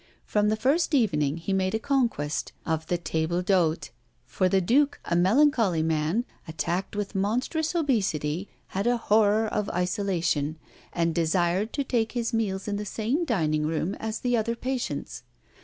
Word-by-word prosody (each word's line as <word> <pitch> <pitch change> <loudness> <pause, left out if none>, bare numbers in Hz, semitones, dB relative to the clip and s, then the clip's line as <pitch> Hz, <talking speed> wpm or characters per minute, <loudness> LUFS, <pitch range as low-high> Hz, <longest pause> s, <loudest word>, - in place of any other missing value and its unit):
From 210 0 +1
the 215 - +2
first 290 +8 +2
evening, 150 - +2
he 170 +4 -3
made 190 +1 +1
a - - 0
conquest 230 - -1
of 160 0 -2
the 175 - 0
table 170 +1 -1
d'hôte, 170 -6 +1 0.3
for 185 +8 0
the 195 - +3
Duke, 280 +10 +2
a 170 - 0
melancholy 200 - +3
man, 160 +8 0 0.2
attacked 170 +5 -3
with 205 -1 -3
monstrous 250 - -1
obesity, 195 - 0 0.2
had 195 +4 -2
a 245 0 +3
horror 215 0 +3
of 210 -1 -2
isolation, 175 -5 -1 0.3
and 170 -1 0
desired 175 +5 +1
to 280 - 0
take 230 -4 0
his 235 -1 -2
meals 200 -4 -1
in 205 -1 -1
the 210 - -3
same 230 - -1
dining 155 - 0
room 165 +4 -1
as 220 0 -4
the 245 -1 +1
other 230 +1 0
patients. 255 +1 -4
200 Hz, 160 wpm, -26 LUFS, 170-230 Hz, 0.3 s, the